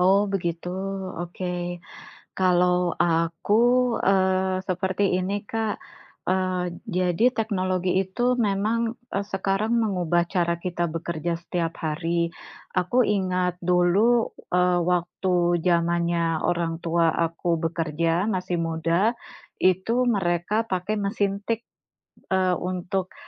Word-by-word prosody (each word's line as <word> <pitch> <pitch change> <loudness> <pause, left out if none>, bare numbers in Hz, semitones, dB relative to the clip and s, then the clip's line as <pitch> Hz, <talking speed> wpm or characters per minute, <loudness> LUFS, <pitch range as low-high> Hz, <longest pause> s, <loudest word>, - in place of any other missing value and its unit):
Oh, 190 +2 +5
begitu, 175 -2 -2 0.5
oke. 175 +1 -6 0.9
Kalau 180 -1 +3
aku, 170 +5 +2 0.4
eee, 190 -1 +2
seperti 190 +2 -1
ini, 195 +2 -2
Kak, 220 0 -2 0.6
eee, 185 -1 0 0.2
jadi 185 +1 0
teknologi 185 -4 0
itu 245 +6 0
memang, 225 +2 0 0.2
eee, 200 +1 -2
sekarang 195 +3 0
mengubah 180 -7 +1
cara 170 -3 +1
kita 175 0 -2
bekerja 170 0 -3
setiap 165 -1 -2
hari. 165 +2 -1 0.5
Aku 190 +8 +2
ingat 185 -4 0
dulu, 180 +7 +3 0.2
eee, 180 0 +3
waktu 180 +1 0 0.3
zamannya 170 -1 +1
orang 170 -1 0
tua 165 -1 +2
aku 165 +1 0
bekerja, 165 +2 0
masih 185 -2 -2
muda, 165 +7 +1 0.5
itu 205 +7 +2
mereka 195 0 +1
pakai 185 +3 -1
mesin 200 0 -1
tik, 230 +1 -2 0.7
eee, 185 -1 +3
untuk, 185 +1 -3
180 Hz, 105 wpm, -25 LUFS, 170-195 Hz, 0.9 s, Oh